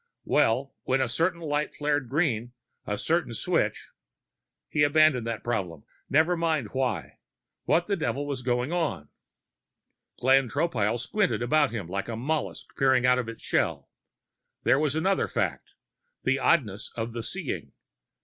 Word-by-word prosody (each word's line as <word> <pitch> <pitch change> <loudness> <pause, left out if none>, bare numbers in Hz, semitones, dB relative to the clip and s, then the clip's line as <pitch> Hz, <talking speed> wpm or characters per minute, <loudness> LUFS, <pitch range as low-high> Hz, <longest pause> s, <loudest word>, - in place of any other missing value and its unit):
Well, 130 +5 +2
when 130 +1 +1
a 130 - +2
certain 170 +8 0
light 150 -1 -1
flared 145 -3 0
green, 125 -5 0 0.3
a 105 - -1
certain 160 -5 0
switch - - -1 0.8
He 150 - 0
abandoned 145 -5 +4
that 115 -2 -3
problem. 90 -10 -2 0.3
Never 160 +5 +4
mind 160 -9 0
why; 125 - -2 0.5
what 175 - +3
the 200 - 0
devil 145 -6 -2
was 140 -3 -3
going 125 +3 0
on? 160 - -2 1.1
Glenn 130 0 +4
Tropile 120 -7 0
squinted 180 - 0
about 145 +3 +3
him 110 -7 -5
like 95 +2 -3
a 115 - -4
mollusc 145 +7 -3
peering 130 -2 +4
out 125 0 +4
of 120 -2 -3
its 115 - -9
shell. - - -1 0.7
There 135 - +4
was 150 -1 +1
another 190 +5 +1
fact, - - -3 0.5
the 135 +2 +2
oddness 115 - +1
of 115 0 -3
the 115 - -3
seeing. - - -4
130 Hz, 150 wpm, -27 LUFS, 115-155 Hz, 1.1 s, abandoned